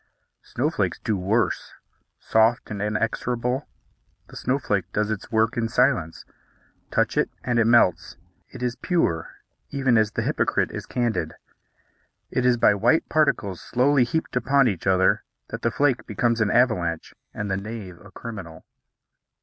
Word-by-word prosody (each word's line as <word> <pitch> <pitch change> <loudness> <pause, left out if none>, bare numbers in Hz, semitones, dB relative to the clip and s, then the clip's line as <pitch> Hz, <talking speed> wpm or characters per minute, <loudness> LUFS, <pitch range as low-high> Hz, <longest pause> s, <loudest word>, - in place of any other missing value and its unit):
Snowflakes - - -1
do 110 - -1
worse: 100 +3 -1 0.5
soft 110 +1 +2
and 100 -1 -4
inexorable, 120 +5 -1 0.6
the - - -13
snowflake 105 -8 -1
does 105 +1 0
its 110 - -5
work 110 +1 +2
in 115 -1 0
silence; 115 -10 +1 0.6
touch - - 0
it, - - +2
and 120 -1 +1
it 115 - +3
melts. 115 -7 +3 0.3
It - - -9
is 125 0 -1
pure, 85 - 0 0.4
even 135 -4 +2
as 110 -1 +1
the - - -1
hypocrite - - 0
is - - -7
candid. 120 -2 -1 1.0
It 125 -1 +1
is 125 -1 +3
by 110 - +5
white 120 +11 +2
particles 105 - +1
slowly 130 +2 +2
heaped 160 +6 -2
upon 135 +2 +3
each 95 -4 -3
other 95 0 +3 0.3
that - - -6
the 115 - +1
flake 130 +2 0
becomes 115 +2 0
an 105 - +2
avalanche 90 -10 +1 0.2
and 105 -2 -4
the 95 - 0
knave 100 -4 -7
a - - -14
criminal. 95 -9 -9
115 Hz, 150 wpm, -24 LUFS, 100-125 Hz, 1.0 s, by